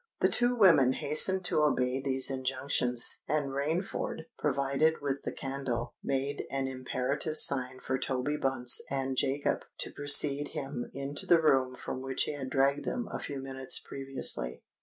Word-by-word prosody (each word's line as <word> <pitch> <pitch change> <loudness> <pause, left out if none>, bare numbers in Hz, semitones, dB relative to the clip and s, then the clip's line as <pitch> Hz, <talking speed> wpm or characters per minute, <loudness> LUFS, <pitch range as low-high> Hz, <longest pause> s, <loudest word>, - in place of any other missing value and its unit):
The - - +3
two 245 0 +2
women 165 - +5
hastened 180 +7 +4
to 155 - +1
obey 130 -3 +1
these 135 -1 +1
injunctions; 130 -2 0
and 145 -2 -1
Rainford, 160 +4 -3
provided 140 +2 +1
with 140 -1 -3
the - - -4
candle, 135 -3 -4
made 140 +1 -2
an 135 -1 -2
imperative 130 +4 -2
sign 130 -2 +3
for 130 0 -3
Toby 135 +4 -2
Bunce 130 -3 +2
and 135 -1 -2
Jacob 135 +2 -1
to - - -3
precede 145 0 +3
him 135 -3 -5
into 140 +1 -2
the 170 - +6
room 135 -5 +2
from 130 - -6
which 135 0 0
he - - -3
had 135 -3 -6
dragged 140 +2 +1
them 240 -4 -4
a - - -4
few 140 - -5
minutes 130 -1 -2
previously. 135 - -3
135 Hz, 160 wpm, -30 LUFS, 130-145 Hz, -, the